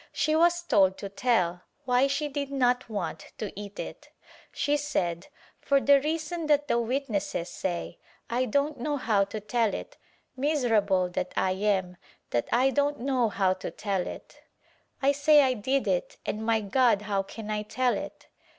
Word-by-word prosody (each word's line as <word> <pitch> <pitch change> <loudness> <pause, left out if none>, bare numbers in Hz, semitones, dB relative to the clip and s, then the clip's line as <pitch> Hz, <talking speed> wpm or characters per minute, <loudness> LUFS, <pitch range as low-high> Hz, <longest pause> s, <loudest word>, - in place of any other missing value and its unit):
She 310 +1 +1
was 345 +1 +3
told 195 - +3
to 200 - -6
tell 195 -5 +1 0.2
why 250 +2 +3
she 295 +2 -1
did 280 -1 -4
not 250 -3 +1
want 200 -7 -5
to 215 - -5
eat 205 0 -8
it. - - -7 0.4
She 290 - 0
said, 185 - -2 0.3
"For 280 -1 +2
the 280 0 +5
reason 320 +2 -2
that 295 -1 +3
the 235 - +2
witnesses 230 -8 -2
say 175 -2 -4
— - - -31
I 245 +2 0
don't 280 +4 0
know 290 +4 -1
how 210 -6 +2
to 215 +2 -6
tell 220 +1 0
it - - -8 0.4
miserable 225 -10 +2
that 180 +1 -4
T 190 +2 0
am 185 -3 0 0.3
that 120 -1 0
I 260 +3 +3
don't 290 +1 +1
know 255 -3 +1
how 190 -2 +2
to 185 - -6
tell 195 -4 -2
it - - -10 0.3
— - - -39
I 275 - +5
say 290 +1 +5
I 260 -1 +2
did 260 +2 -1
it 185 -2 -1
and 215 +1 -3
my 225 -1 +2
God 215 0 +2
how 200 -2 0
can 215 +2 -7
I 210 0 -1
tell 250 +4 0
it?" - - -7
235 Hz, 180 wpm, -27 LUFS, 200-280 Hz, 0.4 s, the